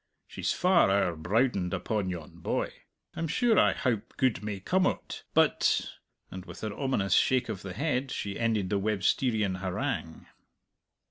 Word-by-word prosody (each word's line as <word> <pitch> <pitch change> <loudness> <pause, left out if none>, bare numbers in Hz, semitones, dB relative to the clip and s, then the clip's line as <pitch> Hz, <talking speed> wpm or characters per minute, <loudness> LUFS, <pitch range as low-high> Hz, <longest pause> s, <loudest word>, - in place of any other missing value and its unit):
She's - - -3
far 180 - +4
owre 95 -3 +2
browdened 95 +2 +1
upon 105 -4 -2
yon 85 -4 -7
boy. - - -2 0.4
I'm 165 -1 -2
sure 235 +7 +3
I - - +4
howp 115 -3 -2
good 130 -4 +1
may 105 -2 -4
come 185 - +2
o't, - - -4
but - - +3 0.2
" - - -44
and 95 0 -7
with 100 - -11
an 110 -2 -3
ominous 105 -8 0
shake 130 -2 +3
of 105 -4 -4
the 95 -1 -6
head 135 - -1
she 100 -5 -4
ended 110 -5 0
the 100 - +2
Websterian 105 0 +1
harangue. 90 -3 -3
105 Hz, 160 wpm, -29 LUFS, 95-130 Hz, 0.4 s, far